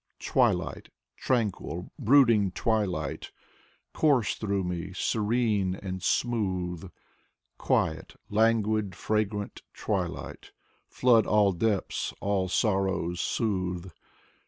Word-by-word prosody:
Twilight -, -, 0 dB, 0.2 s
— -, -, -62 dB
tranquil, 105 Hz, -7 st, -1 dB
brooding 115 Hz, -5 st, +5 dB
twilight, 95 Hz, -11 st, -1 dB, 0.6 s
Course 140 Hz, -8 st, +2 dB
through 100 Hz, -3 st, -2 dB
me, 90 Hz, +1 st, -4 dB
serene 105 Hz, -2 st, 0 dB
and 95 Hz, -1 st, -6 dB
smooth; 95 Hz, -6 st, -1 dB, 0.7 s
Quiet, 80 Hz, +1 st, 0 dB
languid, 110 Hz, -3 st, +1 dB
fragrant 105 Hz, 0 st, -2 dB
twilight. -, -, -4 dB, 0.3 s
Flood 120 Hz, -4 st, +3 dB
all 105 Hz, -2 st, +4 dB
depths, 100 Hz, +2 st, -1 dB
all 95 Hz, -2 st, 0 dB
sorrows 95 Hz, -4 st, 0 dB
soothe. 90 Hz, -5 st, -2 dB
100 Hz, 85 wpm, -28 LUFS, 95-110 Hz, 0.7 s, brooding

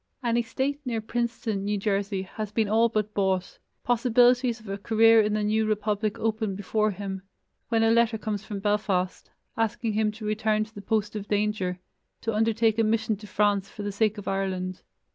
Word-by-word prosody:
An 235 Hz, -1 st, +1 dB
estate 260 Hz, +5 st, -1 dB
near 240 Hz, -4 st, -2 dB
Princeton, 230 Hz, -2 st, -2 dB
New 205 Hz, +1 st, 0 dB
Jersey, 200 Hz, -1 st, -1 dB
has 210 Hz, +2 st, -6 dB
been 220 Hz, 0 st, +1 dB
all 225 Hz, +3 st, +3 dB
but 215 Hz, -1 st, -1 dB
bought, 190 Hz, -2 st, -1 dB, 0.2 s
possibilities 245 Hz, 0 st, +3 dB
of 220 Hz, -, -15 dB
a 195 Hz, +1 st, -4 dB
career 225 Hz, +2 st, +5 dB
in 210 Hz, 0 st, 0 dB
the 210 Hz, -, 0 dB
new 215 Hz, +1 st, +1 dB
republic 210 Hz, 0 st, -1 dB
open 220 Hz, -3 st, -1 dB
before 215 Hz, +2 st, 0 dB
him, 195 Hz, -1 st, -5 dB, 0.5 s
when 225 Hz, -1 st, +2 dB
a 225 Hz, -, +4 dB
letter 230 Hz, -1 st, +3 dB
comes 210 Hz, -2 st, -3 dB
from 205 Hz, -2 st, -6 dB
Belfast, 200 Hz, -3 st, 0 dB, 0.3 s
asking 225 Hz, 0 st, -1 dB
him 215 Hz, 0 st, +1 dB
to 215 Hz, 0 st, -8 dB
return 215 Hz, 0 st, +1 dB
to 215 Hz, +1 st, -13 dB
the 205 Hz, -, -8 dB
post 215 Hz, +1 st, -1 dB
of 205 Hz, -1 st, -5 dB
danger, 205 Hz, -3 st, 0 dB, 0.4 s
to 225 Hz, -, -2 dB
undertake 225 Hz, +1 st, +2 dB
a -, -, +4 dB
mission 220 Hz, 0 st, +1 dB
to 210 Hz, +1 st, -11 dB
France 205 Hz, -1 st, +1 dB
for 210 Hz, -, -8 dB
the 205 Hz, -, -2 dB
sake 215 Hz, +1 st, +1 dB
of 205 Hz, -, -8 dB
Ireland. 185 Hz, -1 st, -2 dB
215 Hz, 190 wpm, -26 LUFS, 205-225 Hz, 0.5 s, career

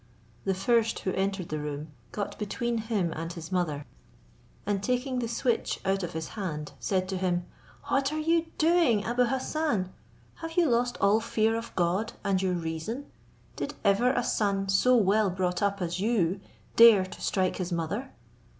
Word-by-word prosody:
The 190 Hz, -, +1 dB
first 230 Hz, +4 st, +2 dB
who 190 Hz, -, -1 dB
entered 195 Hz, -2 st, -1 dB
the 155 Hz, -, -2 dB
room 150 Hz, +1 st, -5 dB, 0.2 s
got 205 Hz, -1 st, -4 dB
between 235 Hz, +3 st, -1 dB
him 210 Hz, -7 st, -1 dB
and 165 Hz, +1 st, -4 dB
his 170 Hz, 0 st, -8 dB
mother, 155 Hz, -6 st, -1 dB, 0.8 s
and 200 Hz, -1 st, 0 dB
taking 250 Hz, +3 st, 0 dB
the 235 Hz, -, -1 dB
switch 235 Hz, 0 st, 0 dB
out 195 Hz, 0 st, +1 dB
of 175 Hz, -1 st, -4 dB
his 160 Hz, 0 st, -4 dB
hand, 160 Hz, -8 st, -4 dB
said 185 Hz, +10 st, 0 dB
to 190 Hz, -, -2 dB
him, 175 Hz, -1 st, 0 dB, 0.4 s
"What 275 Hz, +1 st, +1 dB
are 310 Hz, -, -2 dB
you 330 Hz, +1 st, +2 dB
doing, 315 Hz, -10 st, +3 dB
Abou 245 Hz, +2 st, +2 dB
Hassan? 260 Hz, -, -1 dB, 0.4 s
have 325 Hz, 0 st, -6 dB
you 345 Hz, -2 st, +5 dB
lost 245 Hz, -1 st, +1 dB
all 200 Hz, +2 st, +4 dB
fear 225 Hz, 0 st, +1 dB
of 230 Hz, 0 st, -5 dB
God 185 Hz, +5 st, 0 dB
and 195 Hz, -2 st, +1 dB
your 185 Hz, -1 st, +1 dB
reason? 170 Hz, -, -4 dB, 0.4 s
Did -, -, -4 dB
ever 205 Hz, +4 st, +4 dB
a 245 Hz, -2 st, 0 dB
son 200 Hz, -4 st, 0 dB
so 250 Hz, +6 st, +4 dB
well 210 Hz, -1 st, +3 dB
brought 180 Hz, -1 st, -1 dB
up 200 Hz, -2 st, 0 dB
as 175 Hz, +1 st, -2 dB
you 195 Hz, -4 st, +1 dB, 0.4 s
dare 230 Hz, -5 st, +8 dB
to 185 Hz, -, -11 dB
strike 185 Hz, -2 st, 0 dB
his 180 Hz, -1 st, -3 dB
mother? 175 Hz, +10 st, -2 dB
200 Hz, 175 wpm, -28 LUFS, 180-235 Hz, 0.8 s, dare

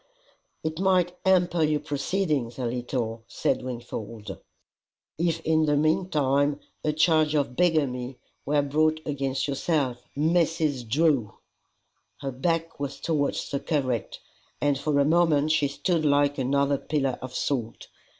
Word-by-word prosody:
"It 160 Hz, +1 st, -3 dB
might 180 Hz, -2 st, +2 dB
hamper 175 Hz, -2 st, +3 dB
your 150 Hz, -1 st, +2 dB
proceedings 145 Hz, -5 st, -1 dB
a 130 Hz, -, -2 dB
little," 120 Hz, -2 st, -3 dB
said -, -, -1 dB
Wingfold, 115 Hz, -3 st, -6 dB, 0.8 s
"if 165 Hz, -1 st, 0 dB
in 160 Hz, -1 st, +2 dB
the 145 Hz, -1 st, +3 dB
meantime 145 Hz, -3 st, +1 dB, 0.2 s
a 155 Hz, -, +2 dB
charge 155 Hz, 0 st, +3 dB
of 140 Hz, -4 st, 0 dB
bigamy 135 Hz, -7 st, +1 dB, 0.3 s
were 145 Hz, 0 st, +1 dB
brought 155 Hz, +2 st, +2 dB
against 135 Hz, -2 st, -1 dB
yourself, 140 Hz, -3 st, -1 dB
MRS. 155 Hz, -5 st, +1 dB
DREW!" 135 Hz, -6 st, +2 dB, 0.8 s
Her 135 Hz, -, -3 dB
back 165 Hz, +5 st, -2 dB
was 140 Hz, -1 st, -4 dB
towards 150 Hz, -4 st, -1 dB
the 140 Hz, -, -1 dB
curate, 130 Hz, -8 st, -1 dB, 0.4 s
and 145 Hz, -1 st, +2 dB
for 140 Hz, +1 st, 0 dB
a 140 Hz, -, +4 dB
moment 155 Hz, -2 st, +3 dB
she 155 Hz, -2 st, +3 dB
stood 160 Hz, +4 st, -1 dB
like 145 Hz, -1 st, +2 dB
another 140 Hz, +1 st, +1 dB
pillar 135 Hz, -4 st, -1 dB
of 130 Hz, 0 st, -7 dB
salt. 120 Hz, -5 st, -2 dB
145 Hz, 130 wpm, -26 LUFS, 135-160 Hz, 0.8 s, a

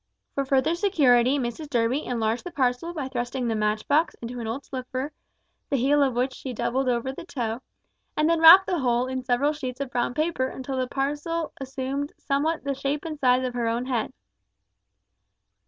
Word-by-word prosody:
For 275 Hz, -, -1 dB
further 270 Hz, +4 st, +2 dB
security 285 Hz, -, +3 dB
Mrs 265 Hz, +4 st, -4 dB
Durby 245 Hz, +3 st, +1 dB
enlarged 230 Hz, -1 st, -1 dB
the 355 Hz, -, -5 dB
parcel 260 Hz, +2 st, 0 dB
by 300 Hz, -6 st, -4 dB
thrusting 245 Hz, -1 st, -3 dB
the 230 Hz, -, 0 dB
match 215 Hz, 0 st, -1 dB
box 310 Hz, +3 st, +2 dB
into 240 Hz, +1 st, -7 dB
an 230 Hz, -, -4 dB
old 260 Hz, +5 st, -4 dB
slipper, 260 Hz, +2 st, -4 dB, 0.6 s
the -, -, +1 dB
heel 280 Hz, +4 st, +3 dB
of 265 Hz, -3 st, +2 dB
which 255 Hz, +2 st, 0 dB
she 260 Hz, -1 st, -6 dB
doubled 255 Hz, +3 st, 0 dB
over 245 Hz, +2 st, 0 dB
the 270 Hz, -, -8 dB
toe, 240 Hz, -7 st, -3 dB, 0.6 s
and 305 Hz, -, +3 dB
then 335 Hz, 0 st, +3 dB
wrapped 340 Hz, +4 st, +10 dB
the 360 Hz, -3 st, -1 dB
whole 245 Hz, -2 st, +1 dB
in 260 Hz, 0 st, -4 dB
several 255 Hz, +4 st, +1 dB
sheets 260 Hz, -4 st, -6 dB
of 275 Hz, -2 st, -4 dB
brown 245 Hz, 0 st, -1 dB
paper 310 Hz, -5 st, 0 dB
until 265 Hz, +1 st, -5 dB
the 255 Hz, -1 st, 0 dB
parcel 295 Hz, +5 st, -2 dB
assumed 270 Hz, +2 st, -3 dB
somewhat 305 Hz, +4 st, -1 dB
the 280 Hz, 0 st, -1 dB
shape 275 Hz, +3 st, -3 dB
and 310 Hz, -2 st, -5 dB
size 255 Hz, -1 st, +3 dB
of 250 Hz, -, -3 dB
her 240 Hz, -1 st, -1 dB
own 235 Hz, +2 st, -1 dB
head. 245 Hz, -2 st, -1 dB
265 Hz, 190 wpm, -25 LUFS, 245-290 Hz, 0.6 s, wrapped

